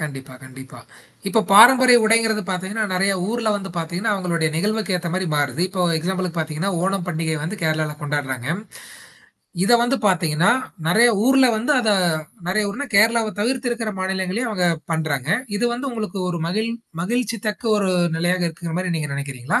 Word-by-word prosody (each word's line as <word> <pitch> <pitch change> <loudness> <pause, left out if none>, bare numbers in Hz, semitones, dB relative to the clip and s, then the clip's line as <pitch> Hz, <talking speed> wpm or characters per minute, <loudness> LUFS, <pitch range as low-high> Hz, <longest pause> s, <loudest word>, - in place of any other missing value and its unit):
கண்டிப்பா, 135 -4 -7
கண்டிப்பா. 130 0 -12 0.5
இப்ப 220 +2 +2
பாரம்பரிய 250 +4 +8
உடைங்கிறது 220 -1 +2
பார்த்தீங்கன்னா, 190 +4 -2
நெறைய 195 +2 +2 0.2
ஊர்ல 230 0 -1
வந்து 195 -1 -7
பார்த்தீங்கன்னா, 175 +6 -2
அவுங்களுடைய 170 -4 -1
நிகழ்வுக்கு 210 +2 -1
ஏத்த 175 -1 -4
மாரி 185 0 -1
மாறுது. 145 0 -1
இப்போ 185 -1 -2 0.2
எக்ஸாம்பிளுக்கு 180 +1 -3
பார்த்தீங்கன்னா, 160 +4 -2
ஓணம் 190 -1 -1
பண்டிகை 160 -1 -2
வந்து 170 +8 -4
கேரளால 155 -1 0
கொண்டாட்றாங்க. 135 -3 -3 1.2
இத 230 - +3
வந்து 245 +3 +1
பார்த்தீங்கன்னா, 170 -2 +2 0.4
நெறைய 230 +7 +5 0.2
ஊர்ல 265 0 +5
வந்து 240 +7 0
அத 225 -3 +1 0.6
நெறைய 210 +3 +1
ஊர்னா 285 +8 -5
கேரளாவ 220 +2 +4
தவிர்த்து 245 +3 -1
இருக்கிற 230 -2 -2
மாநிலங்கள்ளையும் 190 +5 -2
அவுங்க 185 -4 0 0.3
பண்றாங்க. 155 -4 -2 0.3
இது 210 - -1
வந்து 265 +4 -4
உங்களுக்கு 215 -5 -5
ஒரு 170 -1 -4
மகிழ் 215 +6 -1 0.3
மகிழ்ச்சி 230 +3 -1
தக்க 210 - -5
ஒரு 195 -2 0 0.3
நிலையாக 175 +2 0
இருக்குங்கிறமாரி 170 +2 -4
நீங்க 150 -2 -4
நினைக்கிறீங்களா? 140 -3 -2
185 Hz, 155 wpm, -21 LUFS, 160-220 Hz, 1.2 s, பாரம்பரிய